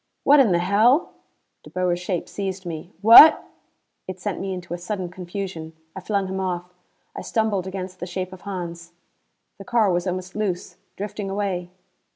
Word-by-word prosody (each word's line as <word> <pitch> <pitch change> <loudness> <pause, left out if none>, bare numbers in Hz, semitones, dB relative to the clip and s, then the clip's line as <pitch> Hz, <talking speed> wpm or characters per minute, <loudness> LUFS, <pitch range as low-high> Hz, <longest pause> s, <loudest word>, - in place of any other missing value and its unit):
"What 290 +1 +6
in 245 -8 +5
the 175 - +3
hell!" 210 - +3 0.5
De - - -14
Boer's 180 -1 -1
shape 180 -1 -3
seized 190 -2 -5
me. 170 +1 -7
"What 230 +9 +9 0.3
" - - -51
It 185 0 -6
sent - - -4
me 195 0 -4
into 180 -2 -6
a - - -3
sudden 180 0 -4
confusion. 180 -2 -6 0.2
I - - -5
flung 200 +1 -1
him 190 0 -4
off. 180 -1 -4 0.4
I - - -5
stumbled 215 -5 -1
against 185 -1 -6
the 180 - -5
shape 185 +1 -5
of 185 - -12
Hans. 170 -3 -7 0.7
The - - -8
car 215 -2 +2
was 175 +1 -1
almost 185 0 -4
loose; 200 -4 -3 0.2
drifting 205 0 -5
away. 195 -3 -3
185 Hz, 180 wpm, -23 LUFS, 180-200 Hz, 0.7 s, What